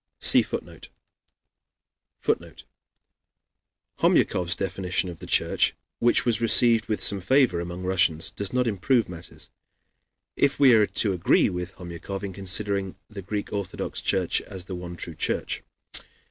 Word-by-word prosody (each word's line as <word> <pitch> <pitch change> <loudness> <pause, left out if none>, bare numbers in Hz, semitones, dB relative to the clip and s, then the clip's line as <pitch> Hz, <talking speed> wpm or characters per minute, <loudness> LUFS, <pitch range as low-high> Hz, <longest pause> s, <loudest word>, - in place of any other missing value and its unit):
[See - - +7
Footnote] - - -7 1.3
[Footnote: - - -2 1.4
Homyakov's 90 +1 +2
definition 95 -1 -2
of 85 - -11
the - - -9
Church, - - +2 0.2
which 120 0 +3
was 115 -2 +1
received 115 0 +4
with 110 - -2
some 100 -2 -1
favor 125 -3 +3
among 85 +1 -5
Russians, 85 -3 +1
does 100 -1 -5
not 125 0 +1
improve 115 +3 +1
matters, 85 -1 -11 0.8
if 140 0 +2
we 135 -3 +7
are 105 -2 +5
to 100 -3 0
agree 90 -2 +3
with 90 +1 -5
Homyakov 90 +3 -7
in 100 -2 -4
considering 100 0 -2 0.2
the 100 -2 -7
Greek 100 +2 -4
Orthodox 100 -3 -4
Church 95 -3 +1
as 95 -3 -9
the 95 - -7
one 90 -1 -6
true 85 0 -7
Church. - - -2
95 Hz, 140 wpm, -25 LUFS, 90-105 Hz, 1.4 s, See